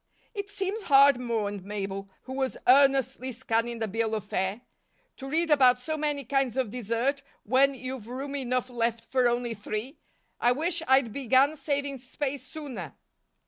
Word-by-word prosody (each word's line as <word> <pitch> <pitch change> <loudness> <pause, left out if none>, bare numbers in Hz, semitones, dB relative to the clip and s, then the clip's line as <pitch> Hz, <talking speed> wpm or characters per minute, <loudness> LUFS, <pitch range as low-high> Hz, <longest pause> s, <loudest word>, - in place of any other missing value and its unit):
"It 405 -2 -5
seems 405 +1 -3
hard," 275 -5 +6
mourned 210 -5 -2
Mabel, 195 -1 -5
who 260 - -7
was 265 -1 -2
earnestly 265 -1 +4
scanning 235 -1 -1
the 225 -1 -2
bill 220 +2 -1
of 215 - -3
fare, 195 +2 -2 0.6
"to 270 - -7
read 325 +2 +1
about 255 -4 +6
so 315 +5 -3
many 295 -2 -1
kinds 270 -1 0
of 255 -6 0
dessert 245 +4 -1 0.2
when 270 +4 +3
you've 255 -3 -6
room 270 +3 -5
enough 255 -2 -1
left 230 -1 -1
for 255 0 +2
only 240 0 0
three. 215 +6 -5 0.4
I 240 +1 +4
wish 330 +5 -1
I'd 265 -4 +4
began 275 +2 +3
saving 280 -1 -2
space 270 +2 -4
sooner." 255 - -7
255 Hz, 160 wpm, -28 LUFS, 230-280 Hz, 0.6 s, hard